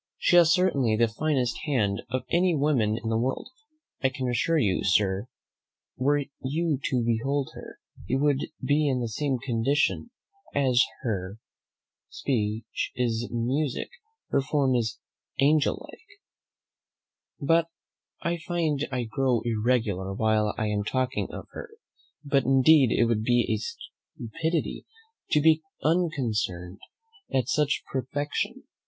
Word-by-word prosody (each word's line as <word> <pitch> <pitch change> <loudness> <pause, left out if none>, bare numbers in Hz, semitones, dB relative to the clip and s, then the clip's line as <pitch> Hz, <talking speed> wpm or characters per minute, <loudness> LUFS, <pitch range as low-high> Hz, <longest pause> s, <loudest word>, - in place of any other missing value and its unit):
She - - +2
has 170 -2 +7
certainly 155 -12 +2
the 115 +1 +3
finest 125 0 -1
hand 105 -10 0
of 130 0 -2
any 175 0 +3
woman 130 -8 +1
in 115 - -2
the 110 - +1
world. 130 - -2 0.5
I 130 - +3
can 130 -1 -4
assure 125 +7 +1
you, 100 -10 +1
Sir, 95 +3 +2 0.7
were 145 +2 +1 0.2
you 150 +2 -1
to 125 -3 +1
behold 135 +5 0
her, - - -10 0.3
you 130 - +1
would 145 0 +1 0.2
be 150 +1 +2
in 130 -2 0
the 120 - -2
same 135 +4 -1
condition; 130 - 0 0.4
for - - +1
as 130 -2 +4 0.2
her 100 -4 -3 0.7
speech 110 -3 -2
is 120 -1 -1
musick, 125 +4 -1 0.4
her 140 - +2
form 135 -1 +1
is 115 -3 0 0.4
angelick. 145 +2 +1 1.4
But 165 +3 +3 0.6
I 170 0 0
find 160 -4 -1
I 125 -2 -1
grow 125 +1 0
irregular 110 -5 0
while 110 0 +1
I 110 - -1
am 105 -1 -1
talking 130 +4 -1
of - - -7
her; - - -8 0.6
but 140 -2 +2
indeed 135 0 +5
it 120 - +3
would 115 -2 +1
be 120 -1 +2
stupidity 160 +8 -5 0.4
to 150 - +3
be 160 +1 +5 0.2
unconcerned 115 - -1 0.5
at 130 -3 +1
such 150 -1 +1
perfection. 145 +2 -3
130 Hz, 130 wpm, -27 LUFS, 115-145 Hz, 1.4 s, has